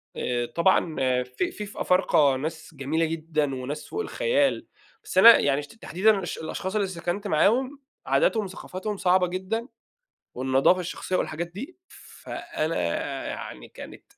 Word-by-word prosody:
آآ، 120 -1 -1
طبعًا 170 +2 +2 0.3
في 125 0 -3
في 210 - -6
في 205 - -8
أفارقة 155 -7 +3
ناس 160 +4 -5
جميلة 150 +4 0
جدًا 155 -3 -1
وناس 135 +4 -5
فوق 435 - -3
الخيال، - - 0 0.4
بس - - -6
أنا 230 +5 +10
يعني 140 0 +1
شت 145 - -12
تحديدًا 200 +3 +2
الش 180 - -5
الأشخاص 185 +5 -5
اللي 205 -2 +1
سكنت 180 +3 -4
معاهم، 250 - +2 0.3
عاداتهم 230 - +2
وثقافتهم 190 +2 -6
صعبة 180 -1 +3
جدًا، 190 +6 -3 0.7
والنضافة 130 +7 +3
الشخصية 180 +1 -4
والحاجات 170 -1 -2
دي. 245 - -9 0.4
فأنا 155 +2 -3 0.5
يعني 60 - -7
كانت - - -11
175 Hz, 140 wpm, -26 LUFS, 150-200 Hz, 0.7 s, أنا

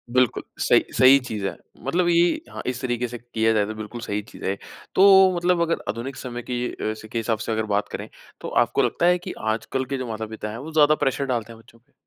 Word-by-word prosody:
बिल्कुल, 125 -3 +2 0.2
सही - - +4
सही 130 +2 +8
चीज़ 110 -6 -5
है। - - -5 0.3
मतलब 175 0 +1
ये 175 - +3
हाँ, - - -7
इस 125 +1 -3
तरीके 120 -1 -1
से 120 +1 -7
किया 115 -1 0
जाए, 105 -2 +2
तो 110 - -5
बिल्कुल 110 +2 -7
सही 105 -1 -2
चीज़ - - -10
है। 95 +1 -1 0.4
तो 190 -1 +7
मतलब 175 0 +2
अगर 165 0 0
आधुनिक 120 +5 -4
समय 120 -1 -6
के 125 0 -1 0.2
अ, - - -3
से 110 0 -11
के 115 - -5
हिसाब 115 -1 0
से - - -1
अगर 110 0 0
बात 105 - 0
करें, - - -6 0.3
तो - - -5 0.2
आपको - - 0
लगता 170 - 0
है 180 0 +5
कि - - -3 0.2
आजकल 130 +3 -3
के 135 +1 -3
जो 130 -2 -4
माता-पिता 110 -1 -5
हैं, 115 - -6
वो 155 +6 -8
ज़्यादा 155 -1 +5
प्रेशर 135 +1 0
डालते 115 -3 -2
हैं 115 - -15
बच्चों 115 0 -21
पे? 140 +4 -39
120 Hz, 245 wpm, -24 LUFS, 110-145 Hz, 0.4 s, सही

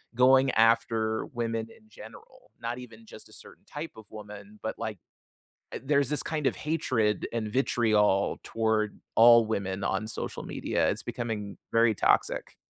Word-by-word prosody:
going 130 +2 +5
after 115 -1 +2
women 115 -2 -2
in 110 - -19
general, 105 - -15
not 120 +1 -3
even 115 -3 -12
just - - -13
a - - -18
certain - - -15
type 150 +3 -7
of 110 - -12
woman, 105 -1 -11
but, 110 - -3
like, 110 -2 -4 0.8
eh, - - -4
there's 140 0 +2
this 150 - -1
kind 155 -3 -1
of - - 0
hatred 130 -9 0
and 110 -2 -2
vitriol 110 -6 +2
toward 110 -2 -1 0.2
all 115 0 +7
women 100 -3 -3
on 95 +3 -1
social 110 - -5
media, - - -1
it's - - -3
becoming 110 -4 -5 0.2
very 115 0 +4
toxic. - - +1
115 Hz, 155 wpm, -28 LUFS, 105-120 Hz, 0.8 s, all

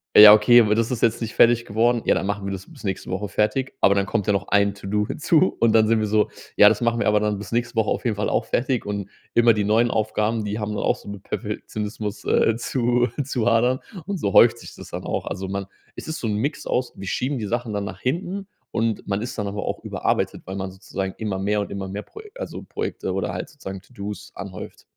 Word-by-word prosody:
„Ja, 105 0 +12
okay, 120 +3 +7
aber 105 -1 +3
das 115 +2 0
ist 120 - -2
jetzt 115 0 +2
nicht 115 - -4
fertig 120 0 +5
geworden, 115 +2 +2
ja, - - +4
dann - - -1
machen 100 0 -2
wir - - -2
das 95 - -8
bis 140 -7 -14
nächste 95 -2 -3
Woche 95 +1 -3
fertig.” 115 +7 0
Aber 100 0 +5
dann 100 0 +1
kommt 105 0 -1
ja 105 - +3
noch 100 - -2
ein 100 0 +3
To-do 105 +1 -2
hinzu 165 +4 +2
und 115 -1 +4
dann 110 -1 +5
sind 115 -1 +3
wir 105 - 0
so: 105 0 +2 0.3
„Ja, 105 - +9
das 110 +1 0
machen 115 0 +1
wir - - +1
aber 105 0 +4
dann 105 -1 0
bis 100 +1 -8
nächste 120 +1 -1
Woche 110 -1 +2
auf - - -1
jeden 110 -3 0
Fall 105 - 0
auch 115 - +1
fertig.” 125 -2 0
Und 100 -1 -4 0.3
immer 120 -1 +6
die 105 -1 0
neuen 115 +3 +3
Aufgaben, 110 +1 0
die 105 +2 -3
haben 105 0 -3
dann - - -2
auch - - +2
so - - -16
mit 100 -2 -8
Perfektionismus, 105 -1 -5
äh, 115 - +3
zu 120 0 +1 0.2
zu 125 -4 -2
hadern, 125 +3 +3 0.3
und 200 -1 -3
so 100 -8 -1
häuft - - +6
sich - - -11
das - - -11
dann - - -5
auch. - - -2
Also 95 +1 -4
man 100 0 -4 0.3
es - - -8
ist 160 - -4
so 115 - -3
'n 105 - 0
Mix 140 +8 -2
aus: 125 -1 0
„Wir 95 - -8
schieben 130 +7 -1
die 105 - -3
Sachen 120 0 -2
dann 100 -1 -2
nach - - -7
hinten.” 180 +8 -2 0.2
und 115 -1 -1
man 100 +1 -1
ist 120 - -5
dann 105 -1 -2
aber 105 +1 -4
auch - - -3
überarbeitet, - - -1
weil 95 +1 -6
man 95 -1 -4
sozusagen 95 0 -5
immer 105 -4 -3
mehr 105 +2 0
und 100 - -5
immer 95 -1 -4
mehr 100 +2 -5
Pro 435 - -12
also - - -6
Projekte - - -4
oder - - -2
halt - - -5
sozusagen 95 - -8
To-dos 105 -2 -8
anhäuft. 95 -2 -8
105 Hz, 255 wpm, -23 LUFS, 100-120 Hz, 0.3 s, Ja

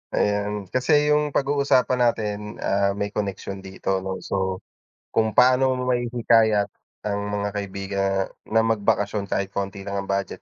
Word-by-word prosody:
Ayan, 105 -1 0
kasi 145 +4 +3
'yung 150 0 +2
pag-uusapan 140 -2 +2
natin, 110 -4 +1 0.3
ah, 100 0 +2
may 100 0 -2
koneksiyon 100 -1 -4
dito 95 0 -2
'no. 95 0 -4
So, 95 -1 -2 0.5
kung 110 -1 +2
paano 130 +2 +5
mo 125 0 -2
mahihikayat 115 -4 +2 0.4
ang 100 -1 -1
mga 100 0 -1
kaibigan 100 -1 -2 0.3
na 110 +1 +2
magbakasyon 105 -2 +1
kahit 100 +1 -1
konti 100 0 -3
lang 100 0 -3
ang - - -16
budget 100 -1 -2
105 Hz, 145 wpm, -24 LUFS, 100-120 Hz, 0.5 s, paano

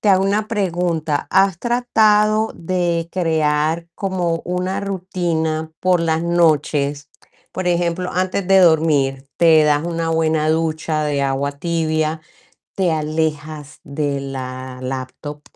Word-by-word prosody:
te 210 - +1
hago 190 -1 +5
una 205 +2 0
pregunta, 175 -8 -1
¿has 195 -2 +3
tratado 220 -2 +2
de 170 -1 -1
crear 160 -1 0
como 180 -4 -1
una 180 +2 -2
rutina 170 -5 -2
por 185 -1 +3
las 160 0 0
noches? 150 -4 +1 0.4
Por 185 -1 -4
ejemplo, 175 +1 0
antes 185 +1 -1
de 195 0 +5
dormir 150 -6 +3
te 160 -2 +5
das 145 0 +2
una 165 -1 -2
buena 160 -1 +1
ducha 160 -1 -1
de 145 -2 0
agua 140 +1 0
tibia, 160 -1 -1 0.6
te 185 -3 +1
alejas 155 -1 -3
de 140 -1 -2
la 130 -1 -6
laptop 135 +3 -6
165 Hz, 125 wpm, -19 LUFS, 150-180 Hz, 0.6 s, hago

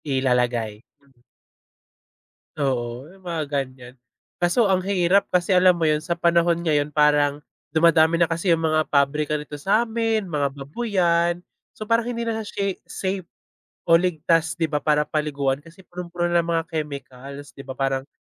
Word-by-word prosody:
Ilalagay, 125 -6 0
mm. 135 -1 -32 1.4
Oo, 125 -1 -2
yung 190 +3 -18
mga 170 -3 -2
ganyan. 130 -3 -5 0.4
Kaso 175 +6 +2
ang 185 -1 +2
hirap 195 0 +3
kasi 180 +1 +2
alam 180 -1 +5
mo 165 - +2
yun, 155 0 +1
sa 170 0 -3
panahon 170 0 +3
ngayon 150 -3 0
parang, 150 -1 +3 0.3
dumadami 165 +1 +4
na 170 - +4
kasi 170 +2 0
yung 165 -1 +2
mga 155 0 +2
pabrika 150 +2 +1
dito 150 0 -8
sa'min, 220 +4 0
mga 145 -4 -1
babuyan, 170 - 0 0.3
so 215 - -9
parang 230 +2 +1
hindi 235 -1 -4
na 225 -1 -2
shi 200 -2 -3
safe 190 0 -4 0.6
o 165 0 +5
ligtas, 165 -2 +1
di 165 -3 -1
ba, 150 - +1
para 150 +1 +2
paliguan 145 -3 -1
kasi 165 +5 -17
punung-puno 175 -1 -4
ng 170 -1 +2
mga 165 -1 +1
chemicals, 140 -2 -6
di - - -20
ba, 130 - -6
parang, 135 0 -1
160 Hz, 155 wpm, -23 LUFS, 140-180 Hz, 1.4 s, alam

